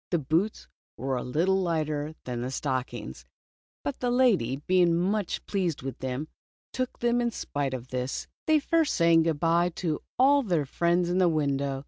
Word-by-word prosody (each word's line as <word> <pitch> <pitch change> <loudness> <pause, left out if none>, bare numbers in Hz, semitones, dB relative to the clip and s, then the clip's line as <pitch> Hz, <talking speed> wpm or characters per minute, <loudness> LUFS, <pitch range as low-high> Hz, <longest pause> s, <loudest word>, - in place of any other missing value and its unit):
The 175 - +2
boots 165 +8 -1 0.3
were 135 0 -2
a 125 - -2
little 175 +10 +1
lighter 155 -3 -1
than 120 -1 -4
the 125 - -3
stockings, 125 - -4 0.6
but 145 - -3
the 245 - 0
lady, 235 - +3
being 180 -2 +4
much 190 +2 -1
pleased 180 -9 -1
with 135 -1 -5
them, 130 +3 -3 0.5
took 255 -1 -3
them 240 0 +1
in 240 - +1
spite 145 - -3
of 125 0 -8
this, 125 +1 -3 0.2
they 315 0 +5
first 325 +1 +1
saying 170 -1 +5
good 160 -2 0
bye 170 +2 +3
to 160 -4 -2 0.2
all 280 +3 +5
their 175 - 0
friends 170 +5 +1
in 180 +2 +1
the 180 -2 +4
window. 140 -3 0
165 Hz, 175 wpm, -27 LUFS, 135-190 Hz, 0.6 s, they